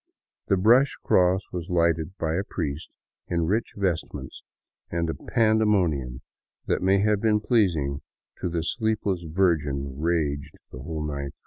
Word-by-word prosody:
The 100 - +3
brush 120 +8 +4
cross 90 +2 +3
w^as 90 0 -5
lighted 85 +1 +1
by 80 -1 -1
a 95 +4 0
priest 80 -5 -4 0.4
in 85 -1 0
rich 105 +7 -1
vestments, 90 -5 -3 0.5
and 85 0 -1
a 80 - -1
pandemonium 100 - +1 0.4
that - - 0
may 95 +2 +4
have 105 -1 +2
been 110 -2 +3
pleasing 85 - +1 0.4
to - - -2
the 85 -1 -2
sleepless 105 -1 -1
Virgin 75 -6 0
raged 75 -4 -1 0.2
the 65 - -9
whole 75 +3 -4
night 70 -2 -4
through. - - -58
85 Hz, 145 wpm, -25 LUFS, 75-100 Hz, 0.5 s, brush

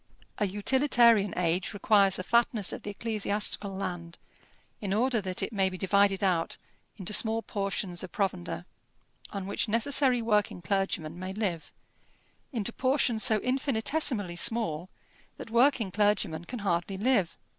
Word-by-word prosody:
A 205 - +1
utilitarian 230 0 +3
age 180 +3 0
requires 200 -1 +3
the 185 - -4
fatness 235 -1 +1
of - - -6
the - - -7
ecclesiastical 205 -1 0
land, 175 -3 -5 0.6
in 200 -2 -1
order 240 0 +1
that 185 -2 -1
it - - -4
may 195 -2 +2
be 185 - -7
divided 200 +1 +2
out 175 -4 +1 0.4
into 195 0 -4
small 225 +1 +2
portions 195 -3 -3
of 185 - -7
provender, 190 - -3 0.6
on 195 -2 -5
which 200 +4 -2
necessary 255 +3 +2
working 210 -5 0
clergymen 175 -2 -2
may 185 +1 -5
live, 190 -6 -3 0.8
into 235 -3 -2
portions 255 -4 +1
so 225 -4 +4
infinitesimally 255 - 0
small 185 -5 -1 0.5
that 225 - -9
working 235 -4 +3
clergymen 200 -5 0
can 245 - -6
hardly 180 +1 -1
live. 210 -5 +1
205 Hz, 140 wpm, -28 LUFS, 185-230 Hz, 0.8 s, so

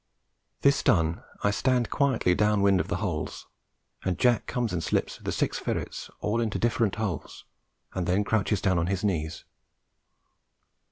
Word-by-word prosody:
This 140 0 +4
done 80 -3 +2 0.2
I 100 - +3
stand 125 +2 +1
quietly 130 -10 +2
down 105 +1 +2
wind 100 -2 +4
of - - -1
the - - -1
holes, - - -3 0.6
and 95 -2 -1
Jack 120 -3 +2
comes 120 -5 -1
and 85 -2 -1
slips - - -1
the - - -3
six - - -1
ferrets - - -4
all 115 +3 0
into 110 -3 -1
different 115 -3 +1
holes, 105 -6 -4 0.5
and 90 -2 -2
then 95 +3 +2
crouches 105 -1 +1
down 95 -3 +2
on 85 - 0
his 95 0 -1
knees. 80 -5 -2
100 Hz, 160 wpm, -27 LUFS, 90-115 Hz, 0.6 s, This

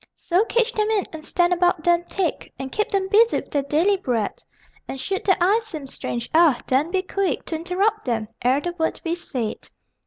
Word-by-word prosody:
So 360 +4 +1
cage 470 0 +1
them 425 0 0
in, 425 -3 +2
and 315 -1 -7
stand 350 +2 +2
about 355 -2 +2
them 345 0 +3
thick, 365 -3 -2
And 265 0 -6
keep 425 - 0
them 390 -1 0
busy 445 +4 +4
with - - -13
their 285 - +1
daily 320 +9 +2
bread; 235 - -2 0.5
And 270 - -6
should 385 +7 -2
their 380 -2 +4
eyes 420 +6 +2
seem 310 -9 -6
strange, 240 -2 -5
ah, 320 -5 +5
then 275 +5 +1
be 375 +1 0
quick 390 0 -1
To 325 - -3
interrupt 385 +6 0
them 225 -4 -1
ere 255 +3 +3
the 350 +3 -3
word 320 - 0
be 330 - -1
said.... 255 -10 -4
345 Hz, 210 wpm, -23 LUFS, 280-390 Hz, 0.5 s, ah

